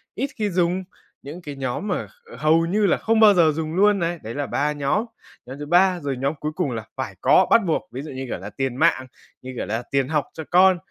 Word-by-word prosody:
ít 270 +5 -2
khi 210 -2 -1
dùng, 180 +1 0 0.4
những 150 +6 -9
cái 145 -4 -8
nhóm 135 +9 -3
mà - - -2
kh 480 -1 -16
hầu 160 +2 +3
như 205 +5 +1
là 190 - +3
không 225 0 +1
bao 215 -2 +8
giờ 170 -4 +4
dùng 155 +1 -4
luôn 205 +1 +4
này. 170 0 -2
Đấy 110 +2 -6
là 145 0 -2
3 150 +2 -1
nhóm, 145 +9 -1 0.4
nhóm 130 +3 -9
thứ 145 - -5
ba 180 +3 +3
rồi, 140 -3 -3
nhóm 135 +3 -1
cuối 150 - -3
cùng 175 -7 -1
là 115 -2 -5
phải - - -5
có, - - +5
bắt 230 - +6
buộc, 170 +1 -1
ví 130 - -6
dụ, 150 - -8
như 130 0 -5
kiểu - - -3
là - - -7
tiền 135 -2 -3
mạng, 130 0 +2 0.3
như 130 0 -8
kiểu - - -3
là 115 +3 -3
tiền 135 -1 +1
học 150 -1 0
cho 160 - -7
con, 185 +1 +6
160 Hz, 260 wpm, -22 LUFS, 135-185 Hz, 0.4 s, bao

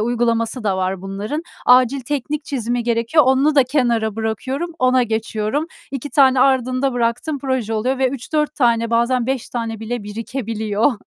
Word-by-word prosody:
uygulaması 230 0 0
da 195 -2 +1
var 185 0 -2
bunların. 205 +11 -4 0.2
Acil 255 +2 +5
teknik 290 +3 -3
çizimi 245 -3 -2
gerekiyor, 235 +6 +2
onu 270 +3 +3
da 275 -3 +5
kenara 235 -5 0
bırakıyorum, 260 +9 -3
ona 255 -1 +3
geçiyorum. 220 +5 -2 0.2
2 275 +1 -5
tane 265 -1 +4
ardında 255 0 +2
bıraktığım 245 +5 -1
proje 260 -5 -2
oluyor 255 +5 0
ve 265 -1 +3
3-4 300 +4 -2
tane 230 -4 +2
bazen 235 +1 +1
5 265 -2 -2
tane 230 -2 -4
bile 230 +1 -4
birikebiliyor. 220 +1 -1
245 Hz, 150 wpm, -19 LUFS, 225-265 Hz, 0.2 s, Acil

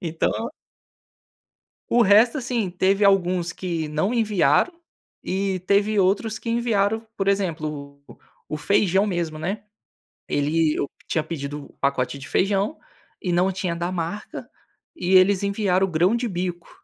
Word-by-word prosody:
Então 165 -1 -1 1.6
O 240 - +5
resto 220 +6 +5
assim, 240 -7 -2
teve 195 +3 +2
alguns 180 -3 +2
que 170 -4 -3
não 155 +9 0
enviaram, 210 - +2 0.5
e 190 -1 -1
teve 205 +1 +2
outros 200 +4 +1
que 230 - -5
enviaram, 225 -2 0
por 195 0 -1
exemplo, 155 -7 -2
o - - -14 0.3
o 155 - -3
feijão 195 +4 +2
mesmo, 170 -5 -2
né. 195 +6 -4 0.6
Ele 150 +2 +1
eu 140 - -2 0.2
tinha 160 - 0
pedido 145 -2 -6
o - - -18
pacote 140 -1 0
de 140 +2 -10
feijão, 200 +8 +1 0.4
e 180 - -2
não 180 +2 +2
tinha 180 -2 -3
da 175 +1 -3
marca, 185 +4 -5 0.5
e 190 - +1
eles 190 +1 +5
enviaram 200 -2 +1
o - - -7
grão 175 +7 +3
de 240 +1 -1
bico. 175 -2 -4
185 Hz, 145 wpm, -23 LUFS, 165-205 Hz, 1.6 s, O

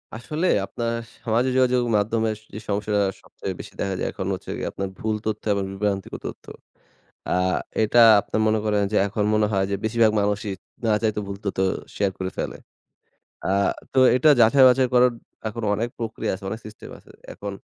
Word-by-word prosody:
আসলে 155 +10 -2 0.2
আপনার 115 +3 -3 0.3
সামাজিক 120 +3 +1
যোগাযোগ 125 -1 +3
মাধ্যমে 110 +2 +1
সে 110 - -25
যে - - -5
সমস্যাটা 105 0 0 0.2
সবচেয়ে - - -6
বেশি - - -9
দেখা 95 - -1
যায় - - -1
এখন 95 - -5
হচ্ছে 95 - -7
গিয়ে, - - -3
আপনার 95 0 -4
ভুল 110 0 -1
তথ্য 110 -1 -2
এবং 100 -1 -1
বিভ্রান্তিক 100 -1 -2
তথ্য। - - -9 0.8
অ্যা - - 0 0.5
এটা 115 +2 +5 0.2
আপনার 110 - -2
মনে 110 0 +3
করেন 105 -1 +1
যে - - +1
এখন 105 +1 -1
মনে 105 0 +3
হয় 95 -1 +2
যে, 100 - 0
বেশিরভাগ 110 -1 +3
মানুষই 105 0 -1 0.3
না 110 - +3
চাইতে 110 -2 0
ভুল 100 0 -5
তথ্য 100 - -3 0.4
শেয়ার 100 -1 +1
করে 95 0 -3
ফেলে। - - -3 0.9
অ্যা 95 - +1 0.4
তো - - +1 0.2
এটা 140 +5 +5
যাচাই-বাছাই 130 +2 +6
করার 125 0 +6 0.4
এখন 115 +1 -6
অনেক 115 +3 -1
প্রক্রিয়া 115 -2 -3
আছে, 95 +1 -10
অনেক 110 - -5
সিস্টেম 110 0 -11
আছে। - - -20 0.2
এখন, 100 0 -6
110 Hz, 180 wpm, -23 LUFS, 100-115 Hz, 0.9 s, যাচাই-বাছাই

